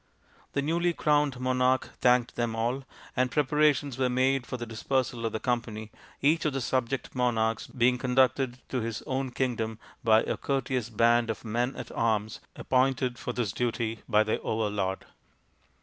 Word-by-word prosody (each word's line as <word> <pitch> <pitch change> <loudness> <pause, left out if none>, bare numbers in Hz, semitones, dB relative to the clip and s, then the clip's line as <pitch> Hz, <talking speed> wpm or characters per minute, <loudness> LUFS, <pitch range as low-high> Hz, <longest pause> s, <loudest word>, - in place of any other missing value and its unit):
The 140 - 0
newly 170 +3 +1
crowned 145 -5 +1
monarch 130 0 +1
thanked 125 -1 +3
them 120 -1 -1
all, 120 +4 -1 0.3
and 130 0 +2
preparations 145 -1 +2
were 130 -1 +2
made 130 +1 +1
for 125 - -4
the 120 - -5
dispersal 120 +1 -1
of - - -3
the 110 - -3
company, 110 -3 -2 0.3
each 155 +4 +3
of 150 - 0
the 135 - -1
subject 130 +1 -1
monarchs 115 -3 0
being 125 -1 +2
conducted 130 0 +2
to 130 - -1
his 115 -1 -4
own 130 0 -2
kingdom 115 -3 -2 0.3
by 110 -1 +5
a - - -2
courteous 130 -4 -1
band 115 +1 +3
of 110 -3 -4
men 120 +4 -1
at - - -7
arms 110 -1 0 0.2
appointed 130 -1 +1
for - - -3
this 120 -5 -1
duty 115 0 -2
by 105 -1 +5
their 110 - -1
overlord. 105 -3 -1
125 Hz, 165 wpm, -28 LUFS, 115-130 Hz, 0.3 s, by